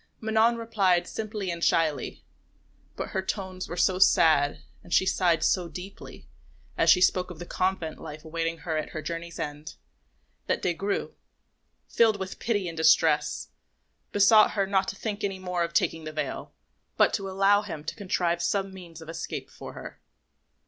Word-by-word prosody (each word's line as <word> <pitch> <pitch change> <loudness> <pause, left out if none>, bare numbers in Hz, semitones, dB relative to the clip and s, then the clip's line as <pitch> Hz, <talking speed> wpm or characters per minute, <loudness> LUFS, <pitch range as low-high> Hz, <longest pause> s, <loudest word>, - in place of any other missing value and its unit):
Manon 220 +1 +3
replied 195 -6 +1
simply 210 -4 -4
and 170 0 -5
shyly, 155 -3 0 0.7
but - - -4
her 190 - -1
tones 190 -1 -4
were 175 - -5
so 185 +1 +2
sad 155 -6 +4 0.2
and 175 - -15
she 190 - +4
sighed 170 -4 +2
so 180 -3 +1
deeply 180 +5 -10 0.5
as - - +2
she 180 - +6
spoke 185 0 +3
of 180 - -9
the 175 - -7
convent 185 -3 -2
life 155 +1 -9
awaiting 165 +1 -2
her 160 -2 -1
at 155 - -3
her 155 - -5
journey's 170 +1 -5
end, 150 +1 -6 0.7
that - - 0
Des 175 - +1
Grieux, 200 +4 -2 0.7
filled 220 -3 +3
with 190 -1 -6
pity 205 -5 -1
and 165 - -5
distress, 155 -2 +3 0.6
besought 210 +2 +6
her 200 -2 +1
not 190 -1 +1
to - - -4
think 210 0 -4
any 195 -1 -1
more 180 -1 -3
of 170 - -3
taking 165 -1 0
the 155 - -6
veil, 150 -3 -4 0.5
but - - +4
to 195 -1 -2
allow 195 +2 +4
him 165 -8 -7
to 155 - -4
contrive 175 -4 -1
some 195 +1 -1
means 170 -4 -11
of - - -15
escape 165 0 -6
for - - -10
her. - - -10
180 Hz, 175 wpm, -27 LUFS, 165-195 Hz, 0.7 s, she